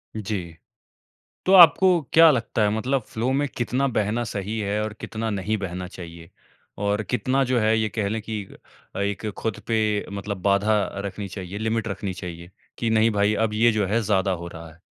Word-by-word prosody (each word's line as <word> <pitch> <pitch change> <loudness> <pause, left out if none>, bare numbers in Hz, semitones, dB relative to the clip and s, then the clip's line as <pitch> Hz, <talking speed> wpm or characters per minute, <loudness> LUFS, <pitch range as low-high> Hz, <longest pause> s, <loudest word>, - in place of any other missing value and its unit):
जी। 95 -6 -4 0.9
तो 190 - +3
आपको 180 0 +7
क्या 165 0 +8
लगता 115 -3 -1
है 105 - +3
मतलब 130 +4 0
फ़्लो 115 +3 -3
में 145 +1 +1
कितना 125 +3 0
बहना 110 0 0
सही 105 0 -4
है 105 0 -1
और 110 0 -4
कितना 110 0 -4
नहीं 105 +1 -1
बहना 90 -2 -5
चाहिए? 85 -2 -10 0.5
और 100 +2 0
कितना 130 +5 0
जो 125 -1 +1
है 110 0 +3
ये 110 -1 0
कह 105 -1 -2
लें 110 +1 -2
कि 105 -1 -4 0.5
अ, - - -3
एक 100 +2 -2
खुद 110 -3 -3
पे 110 -2 +1
मतलब 100 -1 -5
बाधा 100 +2 +3 0.3
रखनी 100 0 -5
चाहिए, 95 0 -7
लिमिट 110 +1 -1
रखनी 100 -1 -4
चाहिए 85 -1 -8 0.3
कि 115 - -1
नहीं 110 0 +3
भाई 105 +1 +2
अब 110 0 0
ये 115 +2 +4
जो 105 -2 0
है 115 +4 +1
ज़्यादा 100 -2 +1
हो 85 -1 -4
रहा 85 -1 -10
है? 80 +1 -21
105 Hz, 195 wpm, -24 LUFS, 100-115 Hz, 0.9 s, क्या